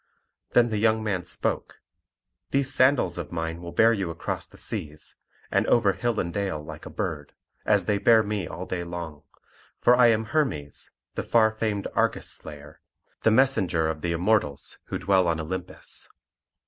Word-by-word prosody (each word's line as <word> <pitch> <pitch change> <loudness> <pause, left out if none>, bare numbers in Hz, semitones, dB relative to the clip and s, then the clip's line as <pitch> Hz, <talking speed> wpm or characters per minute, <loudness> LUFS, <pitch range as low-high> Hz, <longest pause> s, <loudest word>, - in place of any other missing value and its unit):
Then 120 -1 +5
the 110 -2 -1
young 110 0 +2
man 95 -5 -1
spoke: - - -3 0.7
"These 135 0 +2
sandals 130 -7 +3
of 80 - -6
mine 80 0 -3
will 85 -1 -7
bear 115 +5 +5
you 95 -5 -2
across 85 - -4
the - - -17
seas, 75 0 -5 0.3
and - - +2
over 105 -5 +4
hill 120 0 -1
and 85 -1 -2
dale 95 -6 -2
like 75 0 -9
a - - -7
bird, 80 -8 -4 0.3
as - - +3
they 105 -1 +1
bear 110 +2 +5
me 105 -4 -2
all 90 - -6
day 90 -2 -3
long; 85 -4 -6 0.6
for 120 - +5
I 125 -1 +6
am 110 -1 +2
Hermes, 110 - -1 0.2
the - - -2
far 110 -2 +3
famed 110 -2 -2
Argus - - +1
slayer, 75 0 -7 0.4
the - - +4
messenger 100 -10 +3
of 75 -1 -4
the 85 - -1
Immortals 85 -5 0
who - - -3
dwell 95 -2 +2
on 80 -1 0
Olympus." 90 +3 -4
95 Hz, 175 wpm, -26 LUFS, 80-110 Hz, 0.7 s, I